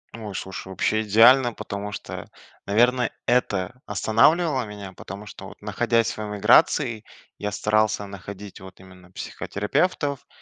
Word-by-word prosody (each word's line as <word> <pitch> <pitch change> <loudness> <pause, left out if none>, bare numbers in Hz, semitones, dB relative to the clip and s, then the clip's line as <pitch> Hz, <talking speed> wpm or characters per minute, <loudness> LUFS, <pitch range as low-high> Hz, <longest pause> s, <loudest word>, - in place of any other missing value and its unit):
Ой, 105 -4 -7
слушай, 95 0 -6
вообще 95 +3 0
идеально, 120 +4 +6
потому 100 -1 -6
что, - - -7 0.4
наверно, 120 +4 +3 0.2
это 120 -1 0
останавливало 130 - +3
меня, 100 -2 -9
потому 100 +3 -9
что 100 -2 -10
вот, - - -14
находясь 115 +2 0
в - - -11
эмиграции, 110 +3 +3 0.4
я 105 0 -3
старался 110 0 +1
находить 100 0 -9
вот 95 -1 -13
именно 95 -1 -16
психотерапевтов. 140 - -2
105 Hz, 125 wpm, -24 LUFS, 100-120 Hz, 0.4 s, идеально